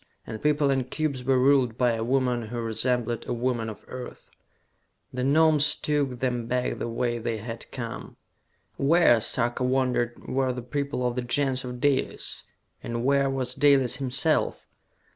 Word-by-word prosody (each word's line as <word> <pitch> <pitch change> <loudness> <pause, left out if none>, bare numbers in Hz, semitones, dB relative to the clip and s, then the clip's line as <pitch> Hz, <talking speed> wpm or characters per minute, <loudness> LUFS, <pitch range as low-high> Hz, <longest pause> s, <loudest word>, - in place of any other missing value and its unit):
And 110 -1 -7
people 150 -1 +2
and 130 -2 -1
cubes 140 -4 -2
were 130 +1 +2
ruled 130 -3 +3
by 125 -2 +3
a 110 0 -2
woman 125 -2 0
who 120 +2 -5
resembled 115 +1 -1
a - - -1
woman 120 -2 -1
of 110 - -10
Earth! 130 -1 -9 0.8
The 125 0 -2
Gnomes 150 +1 +4
took 145 -4 -1
them 125 -3 -1
back 125 +1 -1
the - - -2
way 120 0 -1
they 115 0 -2
had 115 +1 -8
come. 115 -3 -7 0.6
Where, 140 -5 +4
Sarka 120 +2 -1
wondered, 125 -2 0
were 130 -1 0
the 125 -1 -6
people 140 0 -2
of 125 - 0
the 125 - -2
Gens 130 +1 0
of 125 -1 -6
Dalis? 140 0 -1 0.4
And 120 +1 -4
where 140 0 +3
was 130 -2 -2
Dalis 140 -3 +3
himself! 140 +4 0
125 Hz, 160 wpm, -26 LUFS, 120-135 Hz, 0.8 s, Gnomes